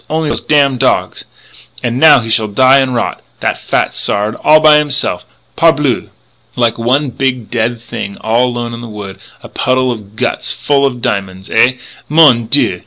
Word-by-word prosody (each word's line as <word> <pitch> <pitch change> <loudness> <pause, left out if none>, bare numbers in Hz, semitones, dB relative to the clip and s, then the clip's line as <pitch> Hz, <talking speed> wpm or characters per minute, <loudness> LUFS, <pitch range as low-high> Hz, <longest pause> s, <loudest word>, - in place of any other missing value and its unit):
Only 155 -1 -1
those - - -2
damn 140 -4 +1
dog 130 - 0 0.7
And 120 +1 -2
now 150 -4 +6
he 115 -1 -5
shall 110 0 +2
die 130 +6 +4
an' 130 -1 -1
rot 115 - -3 0.2
that - - -2
fat - - -1
Sard 105 +2 -1
all 155 0 +6
by 155 -1 +5
himse'f, 140 -11 -1 0.3
parbleu! - - +1 0.5
like 120 -2 0
one 130 +4 0
big 125 -2 -3
dead 115 0 -1
thing 100 -3 -7
all 115 +3 +1
alone 120 -1 -4
in 115 - -7
the 120 - -9
wood.... 100 -2 -9 0.2
A - - -9
puddle 130 0 0
of 105 -3 -9
guts - - -2
full 140 -1 +1
of 125 -3 -6
diamonds! 95 -1 -4
Ah! 125 - +4 0.4
mon 140 -7 +4
dieu! - - +1
120 Hz, 175 wpm, -13 LUFS, 110-140 Hz, 0.7 s, now